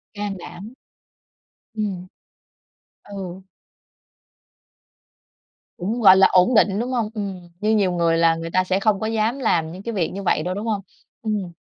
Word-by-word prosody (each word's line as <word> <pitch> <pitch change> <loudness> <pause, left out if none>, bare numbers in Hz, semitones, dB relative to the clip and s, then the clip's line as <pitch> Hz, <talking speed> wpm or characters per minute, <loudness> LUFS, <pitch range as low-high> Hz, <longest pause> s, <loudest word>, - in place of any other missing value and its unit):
Can 205 -1 -4
đảm. 200 +5 -10 1.0
Ừm. 195 -4 -3 1.0
Ừ. 190 -2 -7 2.4
Cũng 215 +7 -3
gọi 190 -3 +8
là 190 - +7
ổn 185 +7 +4
định, 205 -2 +4
đúng 245 +3 -2
hông? 235 -4 -1
Ừm, 195 -5 -6
như 215 +2 +2
nhiều 195 -4 +2
người 170 -1 +1
là 165 0 +4
người 165 0 -5
ta 185 - +2
sẽ 185 +1 0
không 200 0 +2
có 220 - -2
dám 225 +4 0
làm 165 -10 +1
những 185 +3 -9
cái 235 - -4
việc 180 -6 -1
như 200 +1 -5
vậy 165 -4 +1
đâu, 180 +2 -2
đúng 205 +3 -5
hông? 210 -3 -1 0.4
Ừm. 210 -5 -2
195 Hz, 165 wpm, -22 LUFS, 180-215 Hz, 2.4 s, gọi